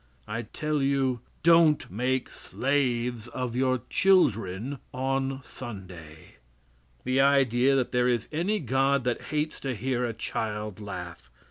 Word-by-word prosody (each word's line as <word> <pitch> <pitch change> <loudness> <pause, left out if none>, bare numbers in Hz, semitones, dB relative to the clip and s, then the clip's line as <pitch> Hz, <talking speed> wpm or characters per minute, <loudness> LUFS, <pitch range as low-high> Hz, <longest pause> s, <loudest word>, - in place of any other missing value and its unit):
I 110 +2 -3
tell 150 +5 -2
you, 135 -2 +1 0.2
don't 165 - +5
make 125 +5 0
slaves 125 -4 -1
of 120 0 -4
your 130 -2 +1
children 125 - +2
on 135 +1 -1
Sunday. 90 -12 -10 0.7
The 130 +1 +2
idea 135 -1 +4
that 130 -2 0
there 125 0 +2
is 120 -3 0
any 180 +7 0
God 135 0 +1
that 120 -1 -2
hates 150 +1 -2
to 135 -2 -3
hear 125 +3 -1
a 120 -2 -1
child 105 -2 -4
laugh! 100 - -7
130 Hz, 130 wpm, -27 LUFS, 115-140 Hz, 0.7 s, don't